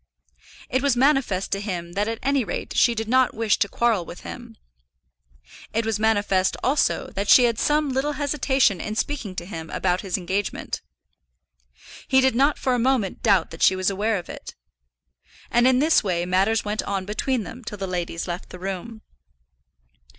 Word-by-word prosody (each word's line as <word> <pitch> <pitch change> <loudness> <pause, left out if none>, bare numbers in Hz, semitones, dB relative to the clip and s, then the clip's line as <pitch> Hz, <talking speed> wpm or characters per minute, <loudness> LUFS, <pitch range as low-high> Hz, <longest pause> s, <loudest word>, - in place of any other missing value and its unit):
It 260 - 0
was 280 -3 +2
manifest 260 -8 +2
to 195 - -1
him 175 -5 -4
that 205 +4 -1
at 225 0 -2
any 275 -1 +2
rate - - -5
she 235 - +4
did 225 0 -3
not 255 +1 +3
wish 220 -2 +1
to 200 - +1
quarrel 230 -5 +1
with - - -10
him. - - -9 1.2
It 225 +1 0
was 220 -2 -1
manifest, 205 -4 +1
also, 280 +3 +1
that 200 +1 -3
she 250 - +8
had 235 -2 +1
some 300 0 +2
little 270 +3 0
hesitation 275 - +1
in 215 - -4
speaking 225 -7 -3
to 175 - -5
him 165 -4 -7
about 180 0 0
his 195 -2 -2
engagement. 190 +2 -3 1.3
He 265 - +4
did 265 0 +3
not 275 +5 +2
for 260 - 0
a 245 - +1
moment 245 -5 0
doubt 195 -6 +2
that 165 - -10
she 190 - +5
was 185 +1 0
aware 210 +2 0
of 175 - -7
it. - - -9 1.0
And 240 +1 +4
in 260 -1 +4
this 310 +2 +3
way 175 -3 -1
matters 195 +5 +1
went 210 +1 -1
on 195 -2 -3
between 225 +4 -1
them 245 +5 -10
till 210 -2 -7
the 195 - -3
ladies 175 -2 -3
left 175 +1 -5
the - - -9
room. 195 +4 -6
215 Hz, 185 wpm, -23 LUFS, 190-255 Hz, 1.3 s, she